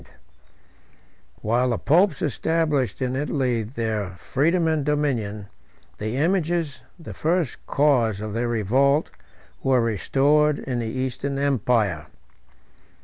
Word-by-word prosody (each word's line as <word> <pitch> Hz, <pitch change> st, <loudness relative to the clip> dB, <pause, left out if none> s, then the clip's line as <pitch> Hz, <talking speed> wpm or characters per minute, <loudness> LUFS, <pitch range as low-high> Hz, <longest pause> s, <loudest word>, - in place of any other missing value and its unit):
] -, -, -33 dB
While 120 Hz, +4 st, +2 dB
the 120 Hz, -, 0 dB
popes 180 Hz, +7 st, +2 dB
established 150 Hz, -3 st, 0 dB
in 130 Hz, 0 st, -1 dB
Italy 130 Hz, -4 st, 0 dB
their 110 Hz, -4 st, -3 dB
freedom 165 Hz, -, +1 dB
and 160 Hz, -2 st, +1 dB
dominion, 125 Hz, -9 st, -1 dB, 0.5 s
the 110 Hz, +4 st, -3 dB
images, 170 Hz, -1 st, 0 dB, 0.2 s
the 165 Hz, -, -9 dB
first 165 Hz, -3 st, -1 dB
cause 125 Hz, -8 st, +2 dB
of 105 Hz, 0 st, -5 dB
their 120 Hz, +2 st, -1 dB
revolt, 130 Hz, +7 st, +2 dB, 0.5 s
were 130 Hz, -1 st, +3 dB
restored 140 Hz, +7 st, +2 dB
in 125 Hz, -2 st, -3 dB
the 115 Hz, -, -3 dB
Eastern 130 Hz, +3 st, -3 dB
empire. 115 Hz, -, +1 dB
130 Hz, 115 wpm, -23 LUFS, 115-150 Hz, 0.5 s, were